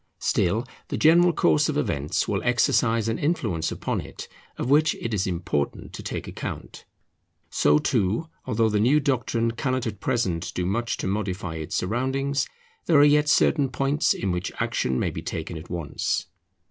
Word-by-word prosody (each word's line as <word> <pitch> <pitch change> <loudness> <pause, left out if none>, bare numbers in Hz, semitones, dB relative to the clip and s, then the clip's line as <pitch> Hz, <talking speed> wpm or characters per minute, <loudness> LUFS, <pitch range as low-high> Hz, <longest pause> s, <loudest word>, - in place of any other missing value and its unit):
Still 110 +8 +1 0.2
the - - -3
general 170 +3 +5
course 80 - +2
of - - -1
events 70 +1 -1
will - - -1
exercise 115 -1 +2
an 115 - -1
influence 110 - -1
upon - - -2
it, - - -9 0.3
of - - -3
which 150 +3 +4
it 115 - -4
is 100 -2 0
important 85 -5 -2
to - - -7
take - - -5
account. - - -7 0.7
So 75 - +4
too, 110 - 0 0.2
although 115 -2 +2
the 105 -1 +1
new 130 +8 +4
doctrine 120 -4 0
cannot 130 +1 -2
at 105 -3 -4
present 90 -9 -1
do 90 - -1
much 115 +6 -1
to - - -3
modify 95 -4 -3
its 80 -1 -5
surroundings, 130 +6 0 0.4
there 160 - +5
are 145 - +7
yet 150 0 +4
certain 145 -3 +3
points 140 +4 +1
in 95 - -2
which 90 +1 -2
action 65 0 0
may - - 0
be - - -6
taken 80 +1 -5
at 80 +2 -9
once. 85 -5 -2
115 Hz, 170 wpm, -25 LUFS, 90-135 Hz, 0.7 s, are